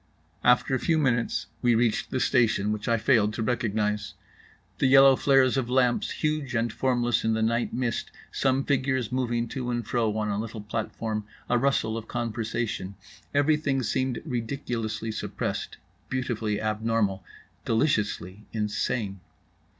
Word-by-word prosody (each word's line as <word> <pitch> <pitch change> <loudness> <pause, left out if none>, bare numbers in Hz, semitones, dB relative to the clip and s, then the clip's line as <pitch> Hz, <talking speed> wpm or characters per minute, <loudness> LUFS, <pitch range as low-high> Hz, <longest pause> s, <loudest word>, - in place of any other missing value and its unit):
After 125 +2 +4
a 130 - +2
few 160 +4 +1
minutes 125 -6 +1 0.2
we 120 -1 +4
reached 115 -1 +1
the 130 - -1
station, 115 -4 +2
which 105 -1 -3
I 115 - +3
failed 110 -3 +3
to 110 - -2
recognize. 105 -3 -1 0.6
The 135 - +3
yellow 135 0 +8
flares 135 -1 +4
of 125 -3 -1
lamps, 125 -1 +2
huge 150 -4 -2
and 115 -1 0
formless 120 -2 +1
in 110 0 +2
the 110 - 0
night 115 +2 +1
mist, 120 -2 -2 0.2
some 135 0 +1
figures 130 -3 0
moving 120 -2 0
to 125 0 -4
and 120 -2 -2
fro 110 -3 0
on 105 -1 -1
a 100 0 -1
little 110 0 -5
platform, 110 0 -3 0.2
a 120 - +2
rustle 120 -4 +1
of 115 -1 -7
conversation: 115 -4 -3 0.4
everything 145 -2 +2
seemed 130 +1 -1
ridiculously 115 -4 -3
suppressed, 110 - -4 0.3
beautifully 115 -5 -1
abnormal, 110 -3 0 0.4
deliciously 105 - 0
insane. 105 -1 -2
120 Hz, 140 wpm, -27 LUFS, 110-130 Hz, 0.6 s, yellow